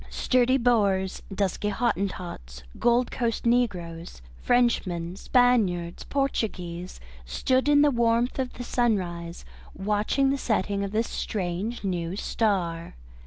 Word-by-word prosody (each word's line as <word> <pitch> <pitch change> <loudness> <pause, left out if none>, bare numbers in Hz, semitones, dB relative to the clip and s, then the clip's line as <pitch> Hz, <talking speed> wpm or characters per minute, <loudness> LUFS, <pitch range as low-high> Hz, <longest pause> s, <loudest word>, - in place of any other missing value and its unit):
Sturdy 255 +1 +2
Boers, 200 -6 +1
dusky 200 +1 -1
Hottentots, 180 - -3 0.2
Gold 240 +1 +2
Coast 235 -3 -2
negroes, 180 - -1 0.2
Frenchmen, 185 -8 +1
Spaniards, 200 -8 +1
Portuguese, 185 -10 -3 0.2
stood 255 - 0
in 290 0 +6
the 295 - +4
warmth 235 +1 +1
of 255 -1 -2
the 245 - -7
sunrise 180 -9 -1 0.3
watching 210 +7 +1
the 275 - -1
setting 200 -4 0
of 200 - -3
this 225 +2 0
strange 200 +4 -3
new 175 -2 -2
star. 180 - -1
210 Hz, 115 wpm, -26 LUFS, 175-245 Hz, 0.3 s, in